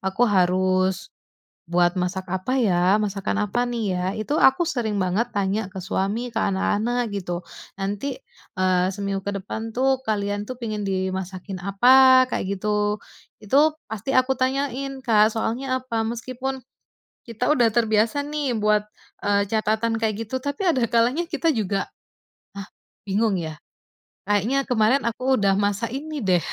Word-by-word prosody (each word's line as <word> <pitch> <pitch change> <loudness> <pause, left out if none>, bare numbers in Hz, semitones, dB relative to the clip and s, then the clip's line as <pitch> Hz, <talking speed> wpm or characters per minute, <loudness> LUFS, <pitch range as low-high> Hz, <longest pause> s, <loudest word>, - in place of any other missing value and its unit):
aku 190 +5 +1
harus, 185 -2 +1 0.5
buat 175 +1 +2
masak 185 +1 -3
apa 190 +7 -1
ya? 180 -2 +3
Masakan 200 -1 -1
apa 245 +4 +1
nih 230 -4 -2
ya? 180 -1 -1
Itu 225 +8 -2
aku 265 +6 +5
sering 225 - -1
banget 200 +7 -1
tanya 200 +1 0
ke 185 0 -8
suami 205 +7 -2
ke 225 - -3
anak-anak 220 +4 0
gitu. 180 -3 -4 0.3
Nanti, 205 +7 -4 0.3
eee, 185 -1 +2
seminggu 200 0 -2
kedepan 205 +3 -4
tuh 265 +1 +2
kalian 205 -1 -1
tuh 255 - -5
pengen 215 -4 -4
dimasakin 190 0 -3
apa? 255 +7 +6
Kayak - - -2
gitu. 210 +1 -1 0.4
Itu 290 +8 +3 0.2
pasti 220 +5 -3
aku 255 0 +2
tanyain, 270 0 -2
Kak, 215 -2 +4
soalnya 255 +3 -2
apa, 230 -3 -2
meskipun 255 +3 -4 0.7
kita 235 +4 -1
udah 245 -6 +4
terbiasa 225 +4 +2
nih 290 -4 -2
buat, 210 -1 +1 0.4
eee, 200 0 +3
catatan 220 +1 0
kayak 220 -2 0
gitu 260 +4 -3
tapi 285 +6 -4
ada 265 -10 +2
kalanya 245 +10 +1
kita 325 -1 +1
juga, 200 -4 -1 0.7
hah 200 -1 -7 0.4
bingung 200 0 +1
ya, 160 -1 -5 0.7
kayaknya 225 +7 +2
kemarin 245 +3 +3
aku 255 +3 0
udah 195 -1 +3
masak 205 +3 0
ini 295 +4 -5
deh, 185 -4 +3
220 Hz, 145 wpm, -23 LUFS, 195-255 Hz, 0.7 s, apa